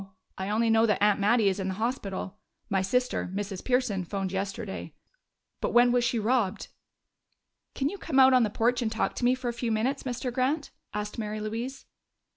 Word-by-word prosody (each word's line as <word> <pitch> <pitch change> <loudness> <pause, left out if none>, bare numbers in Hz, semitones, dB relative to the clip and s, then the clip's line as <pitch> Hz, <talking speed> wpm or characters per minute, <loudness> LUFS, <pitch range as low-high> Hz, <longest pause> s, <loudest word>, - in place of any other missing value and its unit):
I 190 +1 -4
only 225 +2 +2
know 225 +1 +4
that 210 - +2
Aunt 210 -1 +4
Mattie 210 +1 +3
is 195 0 +1
in 190 - -2
the 190 - -1
hospital. 210 -3 -3 0.3
My 195 -1 +2
sister 250 -1 0
Mrs. 200 -2 -4
Pearson 250 -7 +1
phoned 195 +1 -3
yesterday. 195 +2 -4 0.6
But - - -2
when 240 0 +6
was 245 0 +3
she 235 0 +1
robbed?" 220 -3 0 1.1
"Can 275 - 0
you 395 +6 -5
come 290 -5 -2
out 265 0 +7
on 255 - +6
the 220 - +2
porch 235 +4 +1
and 225 -2 -1
talk 225 - 0
to - - -3
me 250 +1 +4
for 255 -1 -5
a - - -3
few 235 -1 -2
minutes, 245 +6 0
Mr. 250 -1 -3
Grant?" 270 +4 0 0.2
asked 210 +2 -4
Mary 215 -1 -3
Louise. 230 +5 -5
225 Hz, 200 wpm, -28 LUFS, 205-250 Hz, 1.1 s, out